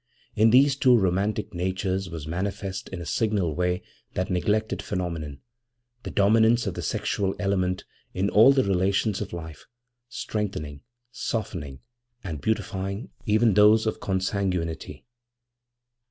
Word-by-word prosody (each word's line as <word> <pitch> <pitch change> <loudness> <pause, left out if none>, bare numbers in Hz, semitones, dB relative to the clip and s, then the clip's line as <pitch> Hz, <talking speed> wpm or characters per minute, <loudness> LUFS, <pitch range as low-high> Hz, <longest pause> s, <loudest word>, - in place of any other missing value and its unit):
In 110 +2 +5
these 135 +3 +5
two 130 -3 +5
romantic 100 +2 0
natures 95 +1 -2
was 80 -3 -6
manifest 95 +2 -4
in 95 -2 -6
a - - -6
signal 100 -2 0
way 90 +2 -1 0.3
that 95 +1 -1
neglected 105 +4 0
phenomenon, 85 -7 -4 0.6
the - - -6
dominance 110 +4 +4
of - - -2
the - - -5
sexual 95 -1 -1
element 95 -2 -1 0.3
in 95 +2 0
all 110 +6 +7
the 135 -1 +3
relations 100 +2 +1
of 100 - -5
life, 80 -3 -8 0.4
strengthening, 95 -12 -4 0.3
softening, 85 - -4 0.4
and 80 -7 -5
beautifying 100 - -2 0.2
even 110 +1 +4
those 105 +2 +6
of 110 - -1
consanguinity. 95 -3 -2
95 Hz, 125 wpm, -26 LUFS, 90-110 Hz, 0.6 s, all